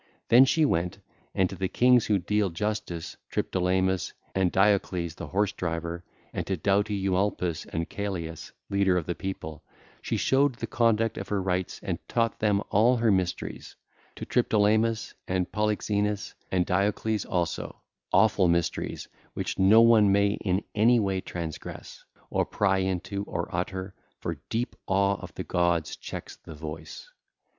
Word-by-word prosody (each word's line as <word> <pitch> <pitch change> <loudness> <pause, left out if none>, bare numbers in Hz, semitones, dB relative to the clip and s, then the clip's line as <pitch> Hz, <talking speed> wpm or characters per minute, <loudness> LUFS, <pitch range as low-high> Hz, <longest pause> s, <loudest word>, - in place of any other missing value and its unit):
Then 120 +5 +8
she 155 +3 +3
went, 85 - 0 0.4
and 95 - +3
to - - -5
the 95 0 -1
kings 125 +3 +4
who 105 - +3
deal 105 +2 0
justice, 90 -2 -4
Triptolemus 95 0 0 0.2
and 95 -2 +2
Diocles, 95 -4 +2
the - - -7
horse 100 +1 +1
driver, 85 -3 -4 0.3
and - - -3
to 95 - -1
doughty 100 +4 +1
Eumolpus 95 -3 -1
and 80 0 -3
Celeus, 90 -6 -5 0.2
leader 100 -2 +3
of 85 - -1
the 90 - -2
people, 80 -5 -6 0.4
she - - -2
showed 135 -1 +2
the 115 - -4
conduct 115 -1 +1
of - - -6
her 105 - 0
rites 95 -1 -2
and - - -2
taught 115 -2 0
them 105 -1 +2
all 120 +5 +4
her 115 -2 +3
mysteries, 95 -3 -2 0.4
to - - -6
Triptolemus 110 -1 +2
and 90 -1 -1
Polyxeinus 105 -1 -1 0.2
and 90 -1 +2
Diocles 100 +3 0
also,—awful 90 +3 0
mysteries 85 -1 -1 0.3
which - - -3
no 100 +4 +7
one 110 -3 +6
may 100 +1 +4
in 95 0 +1
any 115 +3 +4
way 95 -3 0
transgress 85 -4 -7 0.3
or - - +2
pry 95 -2 +1
into 95 +1 -2
or 85 -3 -3
utter, 95 +2 -3 0.3
for - - -5
deep 120 +2 -2
awe 100 +1 +2
of - - -10
the - - -4
gods 85 -2 0
checks - - -8
the 80 - -11
voice. 80 - -8
95 Hz, 150 wpm, -27 LUFS, 90-105 Hz, 0.4 s, Then